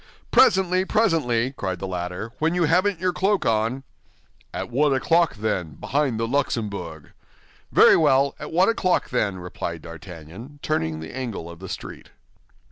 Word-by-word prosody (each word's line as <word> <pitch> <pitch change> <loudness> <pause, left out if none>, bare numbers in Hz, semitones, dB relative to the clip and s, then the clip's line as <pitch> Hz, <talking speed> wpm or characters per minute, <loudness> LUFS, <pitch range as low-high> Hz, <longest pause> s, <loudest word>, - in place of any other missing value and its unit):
"Presently, 185 -5 +4
presently," 155 - +1
cried 95 -8 -4
the 95 - -5
latter, 90 +3 -4
"when 160 +2 +1
you 180 - +2
haven't 180 +4 +2
your 180 0 0
cloak 195 +2 +1
on." 115 +4 0 0.7
"At - - -5
one 140 +2 +2
o'clock, 165 +5 +2
then, 95 -8 -2
behind 135 -5 -1
the 115 - 0
Luxembourg." 105 - -3 0.6
"Very - - +7
well, 140 -3 +3
at - - -7
one 180 +4 +4
o'clock, 185 -6 +1
then," 105 -6 0
replied 85 -2 -6
D'Artagnan, 85 - -10
turning 80 - -1
the 80 - -8
angle 120 -10 -5
of 85 -1 -10
the 95 0 -9
street. - - -8
125 Hz, 150 wpm, -23 LUFS, -, 0.7 s, Very